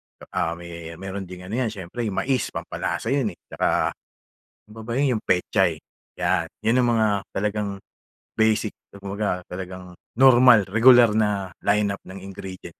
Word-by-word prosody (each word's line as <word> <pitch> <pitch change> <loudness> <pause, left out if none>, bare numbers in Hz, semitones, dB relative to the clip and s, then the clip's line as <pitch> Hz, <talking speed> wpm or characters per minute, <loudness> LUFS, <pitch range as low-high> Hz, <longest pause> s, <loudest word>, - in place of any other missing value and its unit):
tsaka - - -6 0.2
may 85 -1 -9
meron 95 +2 -6
ding 90 0 -10
ano 105 +7 -3
'yan, 125 - +1
siyempre 105 +4 -5
'yong 100 - -3
mais, 130 -2 0
pampalasa 115 - -3
'yon 125 -9 0
eh. - - -55
Tsaka, - - +1 0.8
ano - - -18
pa 110 - -8
ba 115 - -7
'yon? 135 -3 +2
'Yong 110 - -4
pechay, 90 -2 +1 0.4
'yan! - - +1
'Yon 115 +3 +2
ang - - +2
mga 110 -2 +3 0.2
talagang 105 +1 -1 0.7
basic, 110 -1 +2 0.3
kumbaga 100 -2 -3
talagang 90 0 -7 0.2
normal, 125 -4 +7
regular 120 +3 +6
na 105 -3 0
line-up 100 -1 +1
ng 95 +1 -9
ingredients. 95 -3 -9
100 Hz, 155 wpm, -24 LUFS, 95-115 Hz, 0.8 s, normal